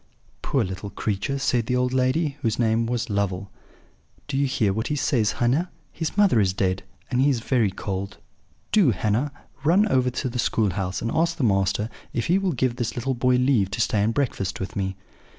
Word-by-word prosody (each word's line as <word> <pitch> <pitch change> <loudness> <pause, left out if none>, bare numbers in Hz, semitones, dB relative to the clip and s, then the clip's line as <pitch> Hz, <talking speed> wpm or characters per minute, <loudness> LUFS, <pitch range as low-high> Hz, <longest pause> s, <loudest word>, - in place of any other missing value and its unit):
"'Poor 135 -4 +1
little 95 +1 -5
creature!' 105 +6 -2
said 120 -4 0
the 125 - +1
old 125 0 +1
lady, 135 +4 +1
whose 115 -4 0
name 115 -1 +2
was 120 -1 -1
Lovel. 100 -2 -2 0.8
'Do 140 - -4
you 140 +1 +2
hear 115 -7 +1
what 110 +3 -2
he 150 - -1
says, 120 -7 +1
Hannah? 135 +9 +1 0.2
His 160 +3 -4
mother 200 - +5
is 95 -3 +2
dead, 95 -1 0 0.3
and 125 0 +2
he 140 - +4
is 130 -4 +1
very 115 -4 +2
cold! 95 +1 -5 0.5
Do, 200 -10 +5
Hannah, 110 +7 0 0.3
run 185 +8 +4
over 130 -5 +3
to 125 +1 -3
the 125 0 -4
school 110 -4 +1
house, 95 +1 -3
and 115 - -1
ask 170 +1 +1
the 150 - -1
master 100 -1 +2 0.3
if 115 - -1
he 180 +3 +3
will 190 -3 0
give 125 -2 0
this 120 -4 -2
little 130 +2 -1
boy 125 +1 +2
leave 125 -6 +3
to 100 - -5
stay 105 -1 +2
and 110 +2 +2
breakfast 115 -7 -1
with 95 - -5
me.' 95 -1 -2
120 Hz, 205 wpm, -24 LUFS, 100-135 Hz, 0.8 s, mother